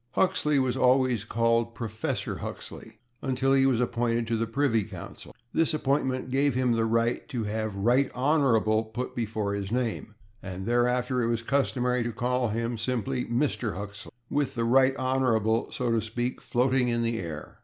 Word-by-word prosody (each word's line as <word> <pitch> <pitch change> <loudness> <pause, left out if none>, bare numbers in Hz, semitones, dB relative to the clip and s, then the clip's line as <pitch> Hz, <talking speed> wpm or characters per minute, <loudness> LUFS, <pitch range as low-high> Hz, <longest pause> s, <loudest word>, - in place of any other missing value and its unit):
Huxley 180 -6 +2
was 130 -2 +1
always 125 -4 +3
called 115 +1 +1
/Professor/ 110 -2 -3
Huxley - - -8 0.2
until 135 0 +1
he 135 0 +4
was 125 -4 +2
appointed 120 -1 0
to 115 0 -1
the 115 0 -1
Privy 115 -2 +1
Council. - - -10 0.2
This 165 -1 +2
appointment 130 -3 0
gave 140 0 +2
him 130 -1 +2
the 115 -1 +2
right 115 +3 0
to 125 -6 -2
have 110 0 -2
/Right 120 +7 +2
Honourable/ 125 -6 +2
put 115 +3 -5
before 110 -3 -2
his 100 0 -4
name, 115 -3 -2 0.3
and 95 0 -6
thereafter 125 +2 +1
it 115 - +1
was 115 0 -1
customary 125 -2 +1
to 120 0 -2
call 125 +2 0
him 115 +1 -2
simply 125 +2 -1
/Mr./ 120 -3 -1
Huxley, 100 0 -8 0.2
with 145 0 -1
the 115 -1 0
/Right 130 +2 +4
Honourable/, 120 -4 +1
so 125 -2 -1
to 115 -1 +2
speak, 120 +3 -3
floating 125 +1 +1
in 120 -1 0
the 115 -1 -1
air. 80 -4 -7
120 Hz, 170 wpm, -27 LUFS, 115-130 Hz, 0.3 s, he